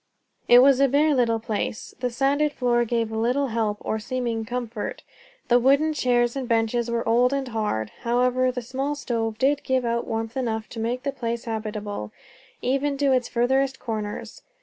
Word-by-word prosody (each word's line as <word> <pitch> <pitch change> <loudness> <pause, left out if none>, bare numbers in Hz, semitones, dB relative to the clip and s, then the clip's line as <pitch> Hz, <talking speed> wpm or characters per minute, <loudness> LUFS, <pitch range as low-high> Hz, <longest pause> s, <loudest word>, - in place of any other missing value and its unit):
It 245 +1 +8
was 270 -1 +5
a 275 - +5
bare 295 +3 +3
little 235 -4 +2
place. 220 0 -4
The 250 0 -1
sanded 280 +4 +1
floor 240 -2 +1
gave 230 -1 -1
little 245 +5 0
help 220 -2 -1
or 220 - -2
seeming 240 0 -2
of 220 - -4
comfort; 240 -3 -4 0.4
the 245 0 +5
wooden 280 +5 +3
chairs 240 -3 +1
and 265 -2 -3
benches 230 0 +1
were 235 -1 -1
old 245 +3 +3
and 275 -1 -1
hard; 210 - -2
however, 250 +2 +2
the 250 -1 -5
small 270 +4 -2
stove 225 -5 -2
did 275 +4 +2
give 260 -2 0
out 235 0 -1
warmth 225 0 -3
enough 225 -4 -2
to 230 - -7
make 240 +3 -2
the 280 - -1
place 235 -2 -3
habitable, 210 - -4 0.5
even 275 +2 0
to 280 -1 +2
its 255 -2 +2
furthest 265 +3 +1
corners. 215 -2 -5
240 Hz, 180 wpm, -24 LUFS, 225-265 Hz, 0.5 s, It